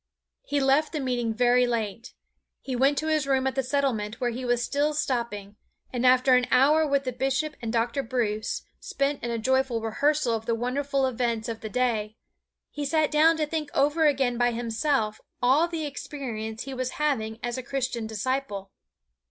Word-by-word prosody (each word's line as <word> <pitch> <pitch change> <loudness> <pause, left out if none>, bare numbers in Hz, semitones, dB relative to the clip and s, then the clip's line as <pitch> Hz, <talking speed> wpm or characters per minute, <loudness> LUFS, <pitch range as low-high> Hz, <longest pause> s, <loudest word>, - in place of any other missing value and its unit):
He 285 0 -1
left 275 +4 +2
the 305 - -1
meeting 245 -4 -1
very 245 +2 +3
late. 230 -1 -3 0.4
He 260 - -4
went 275 +3 +3
to 310 - -1
his 310 -3 +1
room 265 -1 +2
at 265 - 0
the 270 - 0
Settlement 255 -5 -1
where 245 -1 0
he 250 +3 -5
was 245 -1 +1
still 295 +3 0
stopping, 225 -7 -2 0.4
and 250 0 +2
after 255 +1 +5
an 250 0 +4
hour 300 +6 +4
with 280 -1 +1
the 255 - -2
Bishop 270 +4 -1
and 230 -2 -3
Dr. 235 +3 0
Bruce, 225 -4 -2 0.2
spent 280 +1 -2
in 240 - -2
a 235 - -1
joyful 260 +1 +1
rehearsal 250 +4 +1
of 225 0 -3
the 230 - +2
wonderful 270 +3 0
events 235 -2 -1
of 225 -1 -5
the 220 - -5
day, 220 -2 -1 0.5
he 295 - -4
sat 310 +1 +1
down 315 +2 +5
to 310 - +1
think 300 -1 -3
over 295 +3 +3
again 260 -4 +1
by 245 0 +4
himself 230 -1 -1 0.2
all 270 +7 +4
the 330 -3 -3
experience 235 -7 -5
he 270 - -6
was 255 0 -3
having 225 -8 0
as 240 +1 -2
a - - -3
Christian 250 -3 -3
disciple. 220 -3 -3
255 Hz, 185 wpm, -26 LUFS, 230-280 Hz, 0.5 s, after